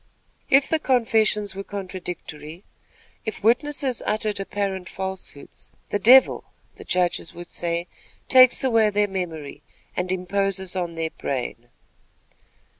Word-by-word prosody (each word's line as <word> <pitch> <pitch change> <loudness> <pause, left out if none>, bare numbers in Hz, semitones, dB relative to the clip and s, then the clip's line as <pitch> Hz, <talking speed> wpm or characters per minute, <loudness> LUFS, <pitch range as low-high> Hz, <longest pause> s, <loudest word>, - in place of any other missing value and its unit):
If 275 +1 +5
the 320 - +1
confessions 220 -6 +2
were 195 +1 -6
contradictory; 180 -4 -7 0.6
if 220 -3 -6
witnesses 260 +2 +1
uttered 215 -1 -1
apparent 195 -2 -3
falsehoods, 190 -6 -7 0.2
'the 205 - +1
Devil,' 250 +6 +6 0.3
the - - -10
judges 180 -2 -1
would 175 +1 -10
say, 170 0 -2 0.4
'takes 255 0 +6
away 225 -4 +4
their 205 0 +1
memory, 165 -7 -5 0.3
and 180 0 -1
imposes 190 0 -1
on 175 -2 -3
their 165 -1 -2
brain.'" 120 -2 -4
195 Hz, 115 wpm, -24 LUFS, 175-220 Hz, 0.6 s, Devil